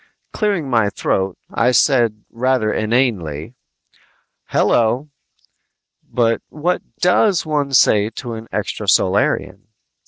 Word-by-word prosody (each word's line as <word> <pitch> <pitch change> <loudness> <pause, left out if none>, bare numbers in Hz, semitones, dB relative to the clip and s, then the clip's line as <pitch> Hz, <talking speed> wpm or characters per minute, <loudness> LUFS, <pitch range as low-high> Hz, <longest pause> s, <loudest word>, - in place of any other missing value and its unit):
Clearing 200 -9 -1
my 115 -5 +2
throat, 95 -1 -2 0.2
I 115 - +2
said 120 -4 +2
rather 125 -2 0
inanely, 110 - -1 0.9
"Hello!" 120 +6 +1 0.9
but 115 -2 0
what 170 +4 -1 0.2
does 180 0 +2
one 145 -3 -1
say 105 -3 +4
to 120 +1 -7
an 110 0 -8
extrasolarian? - - 0
120 Hz, 95 wpm, -18 LUFS, 110-140 Hz, 0.9 s, say